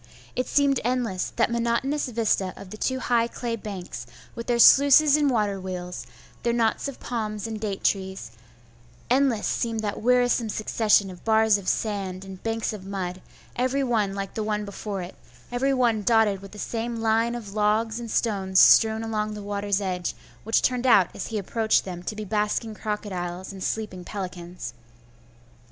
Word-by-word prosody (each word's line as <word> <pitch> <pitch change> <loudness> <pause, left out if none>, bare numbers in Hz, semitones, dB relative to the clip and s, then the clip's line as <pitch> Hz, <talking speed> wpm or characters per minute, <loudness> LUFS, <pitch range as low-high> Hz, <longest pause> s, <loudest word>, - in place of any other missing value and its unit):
It 255 - -1
seemed 280 -2 +3
endless, 235 -6 -1
that - - +2
monotonous 235 +5 0
vista 220 -5 0
of 185 - -11
the 215 - -7
two 260 +4 -1
high 235 -1 +2
clay 235 -1 -4
banks, 185 - -7 0.3
with 235 -1 -7
their 240 - +2
sluices 285 +4 +7
and 295 -2 +3
water 205 -5 0
wheels, 180 -6 -6 0.3
their 235 - +1
knots 230 +2 +1
of 275 - -7
palms 215 -3 -3
and 220 -1 -4
date 205 -3 -4
trees; 190 - -1 0.8
endless 255 -4 +3
seemed 225 -2 -1
that 205 -2 -3
wearisome 245 -1 +3
succession 210 -2 +2
of 180 - -13
bars 220 -2 +4
of 190 - -3
sand 195 -3 -2
and 190 -1 -10
banks 225 0 -2
of 205 -3 -8
mud, 185 -2 -4 0.3
every 255 +3 +1
one 215 -6 0
like 195 -1 -4
the 220 - -3
one 210 -1 -1
before 200 -1 -5
it, 175 - -8 0.4
every 260 +3 +1
one 240 -5 +2
dotted 215 -3 +3
with 195 - -11
the - - -10
same 230 +3 -3
line 225 +1 +1
of 210 -4 -7
logs 215 +2 +1
and 235 -1 -6
stones 195 -5 +1
strewn 220 0 +6
along 215 -1 -2
the 210 - -7
water's 205 0 -1
edge, 180 -2 -2 0.3
which 225 +2 +2
turned 250 0 +1
out 200 -7 +6
as - - -5
he 225 - -3
approached 220 +2 +1
them 180 -2 -6
to 195 +4 -5
be 215 0 -5
basking 210 +2 -1
crocodiles 190 -4 -4
and 190 -1 -7
sleeping 210 -5 -3
pelicans. 180 - -6
215 Hz, 175 wpm, -25 LUFS, 195-235 Hz, 0.8 s, sluices